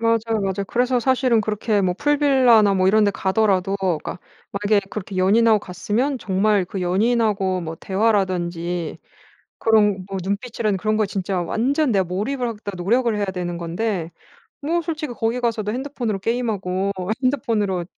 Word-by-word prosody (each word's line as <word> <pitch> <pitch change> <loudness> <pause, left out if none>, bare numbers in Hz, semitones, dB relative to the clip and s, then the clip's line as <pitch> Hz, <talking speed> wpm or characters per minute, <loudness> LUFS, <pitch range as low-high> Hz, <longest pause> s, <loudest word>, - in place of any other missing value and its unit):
맞아요, 230 -1 +1
맞아요. 195 0 -2
그래서 250 +1 +1
사실은 255 -2 +2
그렇게 210 0 0
뭐 185 -2 +1
풀빌라나 260 -6 +4
뭐 185 0 +2
이런 215 +3 +4
데 205 - +3
가더라도 195 -1 +1
그니까 180 -3 -2 0.3
만약에 205 0 +1
그렇게 195 -2 -6
연인하고 215 +4 +4
갔으면 215 +9 -2
정말 200 0 +1
그 190 +2 -6
연인하고 195 0 +1
뭐 165 -1 -5
대화라든지 180 -4 -1 0.6
그런 210 -4 +3
뭐 195 -1 -4
눈빛이라든지 210 +1 -2
그런 215 +2 0
거 215 - +2
진짜 195 -1 -2
완전 260 - 0
내가 195 -4 +2
몰입을 215 +9 -2
하겠다고 210 -3 -6
노력을 235 +3 +2
해야 205 - 0
되는 180 -2 -4
건데 170 0 -3 0.5
뭐 335 +4 0
솔직히 315 -5 -4
거기 230 0 -1
가서도 230 -4 -1
핸드폰으로 245 -5 -3
게임하고 200 -4 -1 0.3
핸드폰으로 210 -9 0
210 Hz, 380 characters per minute, -21 LUFS, 190-235 Hz, 0.6 s, 풀빌라나